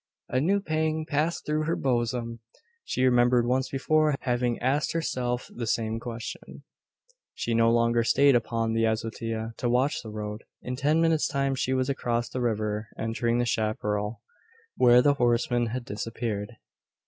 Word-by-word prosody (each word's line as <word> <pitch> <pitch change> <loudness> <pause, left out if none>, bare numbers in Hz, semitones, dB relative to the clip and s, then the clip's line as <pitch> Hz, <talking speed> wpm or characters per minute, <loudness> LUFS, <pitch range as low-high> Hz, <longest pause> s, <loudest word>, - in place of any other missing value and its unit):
A 130 - +1
new 195 +7 +2
pang 155 -3 -1
passed 155 +3 -1
through 155 0 0
her 165 - 0
bosom. 120 -2 -1 0.4
She 130 - 0
remembered 120 -1 +4
once 130 +2 0
before 155 +2 +2
having 120 -1 0
asked 135 +4 0
herself 125 -7 -2
the 115 -1 -4
same 110 0 -1
question. 115 -1 -7 0.7
She 115 - -2
no 115 0 +4
longer 115 0 +3
stayed 140 +3 +4
upon 115 -1 0
the 115 0 +1
azotea 110 0 -3
to 120 - -1
watch 130 +4 +1
the 110 - -9
road. 105 0 -6 0.2
In 125 - -3
ten 150 +5 +2
minutes' 165 -2 +2
time 135 0 0
she 130 0 0
was 130 0 0
across 120 -3 -1
the 130 - -4
river, 110 -2 -1
entering 115 +1 -1
the 120 - +1
chapparal 105 -1 -2 0.5
where 125 0 +6
the 145 - +5
horseman 120 -1 +1
had 120 +2 -4
disappeared. 110 0 -4
120 Hz, 160 wpm, -27 LUFS, 115-135 Hz, 0.7 s, where